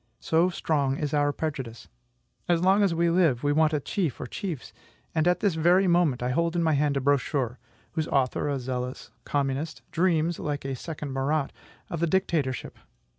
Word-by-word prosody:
So 165 +3 +2
strong 140 -6 0
is 150 -1 -2
our 145 -1 +3
prejudice. 130 -7 -5 0.6
As 170 0 +3
long 195 +2 +5
as 195 -4 +2
we 170 0 +2
live, 165 -9 +3
we 145 0 +2
want 155 +1 +3
a 150 - +1
chief 160 - -2
or - - -4
chiefs; 165 - -5 0.4
and 160 +1 +2
at 180 - +2
this 200 -4 +2
very 175 +4 +4
moment 170 -8 +2
I 125 - 0
hold 170 +5 0
in 170 - +2
my 160 -1 +3
hand 145 -1 +2
a - - +2
brochure, 135 -2 0 0.3
whose 160 -1 -2
author 135 +1 +1
a 140 - 0
zealous 125 0 -4
communist 145 +2 -2
dreams, 170 -1 +1
like 145 -2 -3
a 135 -1 -2
second 150 -1 -6
Marat, 140 +2 0 0.4
of 170 - -3
the 170 - +1
dictatorship. 155 -7 -1
150 Hz, 185 wpm, -27 LUFS, 135-170 Hz, 0.6 s, long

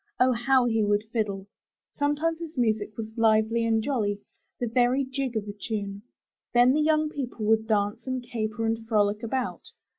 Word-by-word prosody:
Oh, 255 +1 +5
how 250 +1 +3
he 225 -2 +2
would 205 0 +2
fiddle! 200 -4 -1 0.5
Sometimes 300 +3 0
his 330 -3 -8
music 220 -3 +1
was 220 -1 -6
lively 220 +1 +3
and 225 -1 +1
jolly, 210 -7 -1 0.4
the 245 - 0
very 245 +3 +2
jig 265 -3 -3
of 210 -1 -3
a 205 - -5
tune. 205 -2 -4 0.5
Then 245 +2 +6
the 305 - +2
young 310 0 +3
people 250 -7 -5
would 220 0 +2
dance 215 +2 0
and 255 -1 -2
caper 225 -2 -3
and 225 0 -1
frolic 210 -1 +2
about. 250 +2 -2
230 Hz, 175 wpm, -27 LUFS, 215-260 Hz, 0.5 s, Then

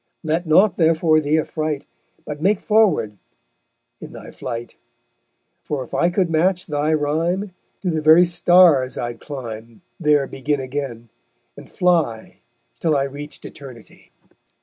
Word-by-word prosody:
Let 160 +2 -1
nought 185 +5 +4
therefore 160 -1 +3
thee 155 +1 +1
affright, 155 -2 -3 0.4
But 150 0 -7
make 195 +3 +2
forward 170 - +1 0.8
in - - -10
thy - - -10
flight; 120 -2 -7 0.9
For 145 -3 -3
if 125 - -16
I 140 +6 +2
could 180 0 +1
match 175 +3 +1
thy 150 0 -1
rhyme 165 +6 -1 0.3
To 180 - 0
the 160 -1 -1
very 160 +3 +6
stars 175 -6 +4
I'd 120 -1 -5
climb, 115 -2 -8 0.2
There 150 -4 +3
begin 140 +2 -2
again, 130 -3 -5 0.5
and - - -13
fly 165 -11 0 0.4
Till 155 -3 +1
I 135 - +1
reached 145 +2 -7
Eternity_. 130 -5 -12
150 Hz, 135 wpm, -20 LUFS, 135-170 Hz, 0.9 s, very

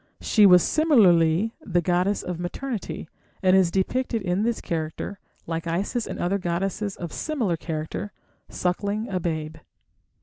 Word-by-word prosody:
She 210 -3 +5
was 180 -2 +7
similarly 205 - +4
the 175 -4 0
goddess 180 +4 +1
of 180 -2 -4
maternity, 215 +2 -4 0.4
and 185 0 +5
is 190 -3 +4
depicted 225 +5 -1
in 180 +1 0
this 230 +1 0
character, 165 +4 -4 0.3
like 165 +1 -4
Isis 200 +8 -1
and - - -5
other 195 +3 0
goddesses 195 +3 -2
of 170 -2 -7
similar 245 - -1
character, 160 +5 -5 0.4
suckling 200 +5 -2
a 185 -2 -1
babe. 160 -2 -3
185 Hz, 140 wpm, -25 LUFS, 170-210 Hz, 0.4 s, was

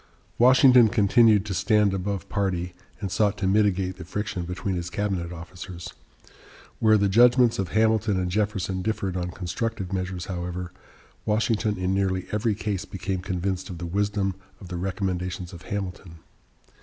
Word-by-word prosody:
Washington 125 -1 +7
continued 110 -1 +4
to 100 - -3
stand 105 0 +3
above 95 +1 -3
party, 90 -3 -1 0.3
and 100 -4 -4
sought 105 0 +1
to 95 - -2
mitigate 95 -2 +2
the 90 - -8
friction 95 0 -4
between 90 +2 -3
his 85 -1 -3
cabinet 95 -5 -2
officers. 85 +1 -8 0.9
Where 110 -1 +5
the 100 -1 +2
judgments 120 +3 +5
of 95 - 0
Hamilton 110 -2 +2
and 90 -1 -2
Jefferson 100 -2 -1
differed 100 -2 -2
on 90 -1 -2
constructive 95 +2 -4
measures, 90 -1 -3
however, 90 -1 -4 0.5
Washington 105 0 0
in 90 +1 0
nearly 95 -1 0
every 105 0 0
case 100 -3 -3
became 95 0 -4
convinced 95 0 -3
of 90 - -6
the 85 - -5
wisdom 100 +2 0 0.3
of 95 - -11
the 90 - -4
recommendations 90 -1 -3
of 85 - -10
Hamilton. 95 -3 -5
95 Hz, 155 wpm, -25 LUFS, 90-105 Hz, 0.9 s, Washington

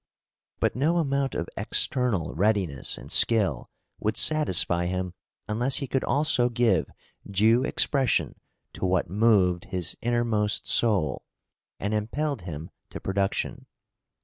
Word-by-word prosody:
But - - +1
no 155 +7 +1
amount 140 -4 0
of - - -2
external 125 -10 0
readiness 95 -6 0
and - - -10
skill 110 -4 +2 0.3
would - - -1
satisfy 90 - +2
him 90 0 -3 0.3
unless 120 +5 0
he 140 - -1
could 135 0 -1
also 135 -4 +2
give 115 -5 +1 0.4
due 110 +5 +3
expression 135 -2 +1 0.4
to 95 - -2
what 90 -2 0
moved 95 -5 +3
his 90 -2 -4
innermost 115 -3 0
soul, 95 - +1 0.6
and 100 +2 -2
impelled 135 +5 -2
him 80 -3 -7 0.2
to - - -7
production. 95 0 -2
110 Hz, 120 wpm, -26 LUFS, 95-125 Hz, 0.6 s, due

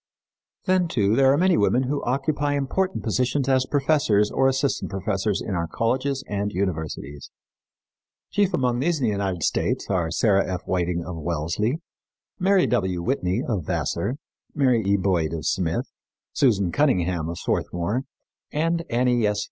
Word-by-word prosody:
Then, 185 -2 +2
too, 105 -8 +1
there 135 0 +5
are 140 - +3
many 185 +2 +3
women 120 +5 +3
who 140 +2 -2
occupy 145 +3 0
important 185 +7 -1
positions 125 +4 0
as 130 -1 +2
professors 135 -8 +2
or 135 - +3
assistant 135 +1 0
professors 95 +1 -1
in 100 - -4
our 85 -2 -1
colleges 130 +7 -1
and 100 0 -2
universities. 80 -7 -4 1.0
Chief 200 -2 +2
among 125 -2 0
these 165 +5 +1
in - - -3
the 110 - +2
United 95 -5 -2
States - - 0
are 90 -4 +1
Sarah 100 0 +2
F. 90 - -3
Whiting, 90 -2 -1
of 90 -2 -6
Wellesley; 85 - -1 0.6
Mary 190 0 +4
W. 90 -3 0
Whitney, 100 -1 0
of 100 - -2
Vassar; 115 +7 -1 0.4
Mary 130 -5 +3
E. 100 +1 +2
Boyd, 90 -5 0
of 80 -2 -4
Smith; 85 +1 0 0.5
Susan 100 -9 +2
Cunningham, 90 - +1
of 85 - -5
Swarthmore, 90 +7 -1 0.5
and 165 +2 0
Annie 120 -2 +2
S. 105 0 0
110 Hz, 155 wpm, -24 LUFS, 90-135 Hz, 1.0 s, there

